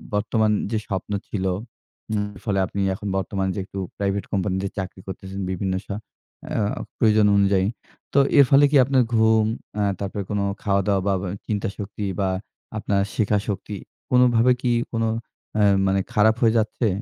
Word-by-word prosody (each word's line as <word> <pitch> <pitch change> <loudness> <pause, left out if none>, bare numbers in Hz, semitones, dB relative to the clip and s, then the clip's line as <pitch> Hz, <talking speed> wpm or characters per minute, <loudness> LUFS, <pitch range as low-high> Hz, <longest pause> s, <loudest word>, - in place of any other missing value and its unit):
বর্তমান 110 +1 +2 0.2
যে 110 - +1
স্বপ্ন 95 0 -4 0.2
ছিল, 95 -3 -3 0.7
উম 105 -1 0 0.2
ফলে 100 -3 0
আপনি 100 +2 -3
এখন 100 - -6
বর্তমান 95 0 -1
যে - - -4
একটু 95 - -7 0.2
প্রাইভেট 100 0 -1
কোম্পানিতে 95 -1 0
চাকরি 95 -1 -5
করতেছেন 95 0 -7
বিভিন্ন 95 +1 -1
স্ব - - -8 0.7
আ - - +1 0.4
প্রয়োজন 110 -1 +4
অনুযায়ী, 100 -1 +3 0.5
তো 140 - +5 0.2
এর 140 - +9
ফলে 140 +1 +7
কি 150 - +6
আপনার 130 -1 +3
ঘুম, 110 -1 +4 0.3
অ্যা 105 -1 +1
তারপরে 100 0 -3
কোনো 100 -1 0 0.2
খাওয়া-দাওয়া 100 -1 +2
বা 100 - +3
বা 95 - -3 0.2
চিন্তাশক্তি 105 0 -3
বা 95 -1 +1 0.5
আপনার 100 -2 +1
শেখা 105 -1 +2
শক্তি 105 0 -4 0.4
কোনোভাবে 125 -1 +5
কি 125 - +1 0.2
কোনো 115 -1 0 0.5
অ্যা 105 -1 +4 0.2
মানে 95 0 +2
খারাপ 110 +1 +4
হয়ে 115 -2 +4
যাচ্ছে? 110 +2 0
105 Hz, 160 wpm, -23 LUFS, 95-110 Hz, 0.7 s, এর